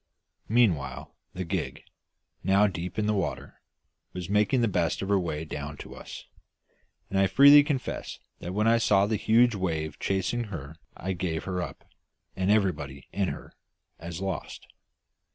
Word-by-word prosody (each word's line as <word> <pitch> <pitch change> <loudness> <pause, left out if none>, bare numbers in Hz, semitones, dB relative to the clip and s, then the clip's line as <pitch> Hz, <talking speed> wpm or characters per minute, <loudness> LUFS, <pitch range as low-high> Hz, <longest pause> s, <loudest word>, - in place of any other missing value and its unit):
Meanwhile, 80 - +1 0.2
the 90 0 -3
gig, 85 - -3 0.6
now 100 +3 +4
deep 90 -1 -3
in 105 - +1
the 105 - +2
water, 95 -3 -3 0.5
was 90 -1 -6
making 105 +5 +3
the 115 - +3
best 90 -2 0
of 95 - -4
her 100 -1 +4
way 80 -3 -3
down 75 -1 -6
to - - -9
us, - - -9 0.9
and 95 - +1
I 95 - +4
freely 140 +8 +8
confess 145 -3 -3 0.2
that 90 +2 -6
when 105 +1 +2
I 115 0 +5
saw 100 -3 +4
that 110 +2 0
huge 120 +3 +4
wave 80 -6 -2
chasing 100 +5 -1
her 80 -6 -8 0.2
I 95 +2 -3
gave 85 -3 -2
her 90 -1 -2
up, - - -7 0.5
and 95 +1 0
everybody 75 -10 0
in 100 -2 0
her, - - -7 0.5
as 85 +1 -6
lost. 95 -1 -4
95 Hz, 160 wpm, -27 LUFS, 85-105 Hz, 0.9 s, freely